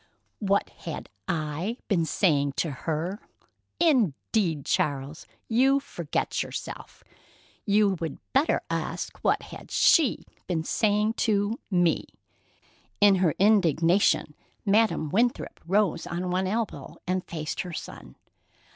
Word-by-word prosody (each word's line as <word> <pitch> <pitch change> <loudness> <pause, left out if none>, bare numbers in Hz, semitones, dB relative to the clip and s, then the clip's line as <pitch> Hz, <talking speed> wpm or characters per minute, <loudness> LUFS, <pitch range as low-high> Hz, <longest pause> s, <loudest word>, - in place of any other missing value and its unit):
"What 200 -1 +1
had - - -7 0.2
I 165 +8 -2
been 175 -6 +2
saying 145 -6 +2
to 160 +2 -1
her? 165 +8 -3 0.6
Indeed, 210 - +1
Charles, 140 +1 -1 0.2
you 265 +4 +4
forget 170 - -3
yourself! - - -7 0.6
You 205 -2 +3
would 165 -3 -4 0.2
better 280 +4 +3
ask - - -3
what - - +1
had - - -11
she 310 -8 +4 0.2
been 165 -3 -1
saying 210 +4 +1 0.2
to 205 +2 +1
me." 175 -4 +2 0.9
In 205 -1 +7
her 165 -5 +2
indignation, 180 -5 +3 0.3
Madam 205 -6 +2
Winthrop 240 +4 0
rose 195 -3 +1
on 180 +1 -3
one 185 +1 0
elbow 220 +3 -3
and 185 0 -1
faced 155 -2 -4
her 180 - -6
son. - - -8
185 Hz, 115 wpm, -27 LUFS, 160-215 Hz, 0.9 s, In